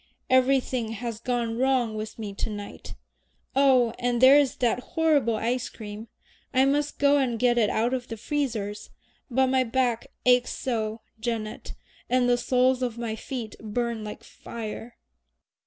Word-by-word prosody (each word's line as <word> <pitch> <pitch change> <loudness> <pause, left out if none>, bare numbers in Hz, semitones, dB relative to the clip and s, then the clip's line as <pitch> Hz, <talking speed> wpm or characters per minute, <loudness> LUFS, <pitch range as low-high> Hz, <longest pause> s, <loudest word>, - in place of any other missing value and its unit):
"Everything 255 -3 +2
has 230 -1 -5
gone 235 -1 -2
wrong 255 -4 +2
with 215 0 -6
me 210 -3 -5
to 200 - -3
night. 205 -1 -8 0.6
Oh, 260 -4 +4
and 245 -1 0
there 260 +3 +8
is 285 -3 +3
that 245 -1 +1
horrible 295 -6 +1
ice 240 +3 -1
cream! 215 0 -9 0.5
I 260 +1 +5
must 290 +2 0
go 285 0 +4
and 255 -4 +1
get 240 0 +3
it 215 -3 +3
out 235 +3 +1
of 250 -1 -3
the 225 - -6
freezers. 220 -6 -3 0.4
But 265 +1 +3
my 260 0 +2
back 245 -1 0 0.2
aches 250 0 +4
so, 220 -3 -2 0.2
Janet, 220 -2 -4 0.3
and 250 0 +3
the 245 0 +3
soles 255 0 +2
of 240 -2 -2
my 230 -2 -3
feet 230 -2 -6
burn 230 +1 -3
like 210 - -7
fire." 230 +1 -8
240 Hz, 155 wpm, -26 LUFS, 225-260 Hz, 0.6 s, there